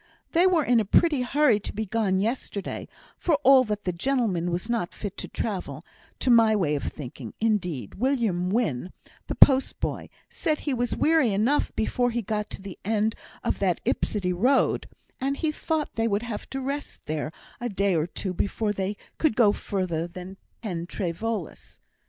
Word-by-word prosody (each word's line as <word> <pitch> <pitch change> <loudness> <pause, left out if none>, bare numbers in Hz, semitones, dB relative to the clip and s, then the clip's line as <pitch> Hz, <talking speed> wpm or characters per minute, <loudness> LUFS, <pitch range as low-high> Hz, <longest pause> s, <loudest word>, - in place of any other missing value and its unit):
They 345 +3 +5
were 345 -4 +3
in 245 -3 +4
a - - +2
pretty 295 - +3
hurry 250 -3 +3
to - - -6
be 220 +1 -2
gone 195 -2 +1
yesterday, 215 -2 -3 0.3
for 335 - +2
all 265 0 +8
that 210 -1 -3
the 180 - 0
gentleman 190 -4 0
was 175 +5 -2
not 235 -7 -1
fit 205 -2 -5
to - - -5
travel, 200 -5 -4 0.3
to 255 - +2
my 225 -2 +6
way 170 -8 +1
of 145 - -1
thinking; 125 -5 -7
indeed, 180 - 0
William 225 -8 0
Wynn, 185 - 0 0.3
the - - -3
post 270 -1 +5
boy, - - -3 0.2
said 310 -4 -1
he 290 - -1
was 245 -1 0
weary 310 -7 +3
enough 220 +9 +2
before 245 +3 +1
he 235 -1 -2
got 210 +1 -2
to 190 - -8
the 195 -2 -8
end 220 +1 +1 0.3
of - - -1
that - - +1
Yspytty 185 -4 0
road; 255 +9 +2 0.3
and 275 +2 -1
he 315 -2 0
thought 310 0 -2
they 225 0 +1
would 205 0 0
have 230 -3 -5
to 270 - -4
rest 280 +2 -5
there 155 0 -2 0.3
a 245 0 -2
day 200 -1 +1
or 160 0 +1
two 185 +1 -4
before 205 +3 -1
they 195 +1 -2 0.2
could 310 -8 +2
go 215 -4 +6
further 180 -5 -2
than 185 +2 -9 0.3
Pen 175 -5 -3
trê 175 -2 -2
Voelas. 215 0 -5
215 Hz, 185 wpm, -26 LUFS, 185-250 Hz, 0.3 s, all